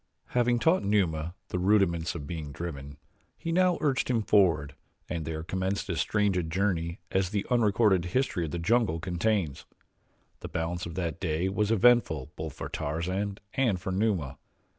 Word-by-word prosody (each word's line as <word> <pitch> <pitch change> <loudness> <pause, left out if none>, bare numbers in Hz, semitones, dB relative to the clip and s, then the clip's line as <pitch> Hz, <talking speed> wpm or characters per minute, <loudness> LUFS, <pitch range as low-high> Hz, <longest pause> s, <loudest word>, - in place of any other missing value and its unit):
Having 120 0 +2
taught 165 +9 +3
Numa 85 -5 0
the 90 - -2
rudiments 90 -4 +2
of 75 -4 -5
being 75 -2 -5
driven, 70 -2 -6 0.4
he 165 - -4
now 180 0 +3
urged 140 -5 +1
him 115 -3 +1
forward 85 -10 +3 0.3
and 85 -3 -3
there 80 0 -4
commenced 95 +3 -2
as 80 - -2
strange 105 -2 +1
a 90 - +2
journey 85 0 -1
as 95 -1 +1
the 100 0 -2
unrecorded 105 -5 +3
history 90 -3 0
of - - -5
the 85 - -3
jungle 105 -1 +2
contains. 90 -3 -1 0.7
The - - -7
balance 85 +2 -3
of 85 - -8
that 85 -4 -3
day 85 +1 0
was 105 +2 0
eventful 110 - +3
both 80 -2 -5
for - - -6
Tarzan 95 +7 -2 0.2
and 120 -9 +1
for 95 - -4
Numa. 95 -8 0
90 Hz, 165 wpm, -28 LUFS, 80-105 Hz, 0.7 s, taught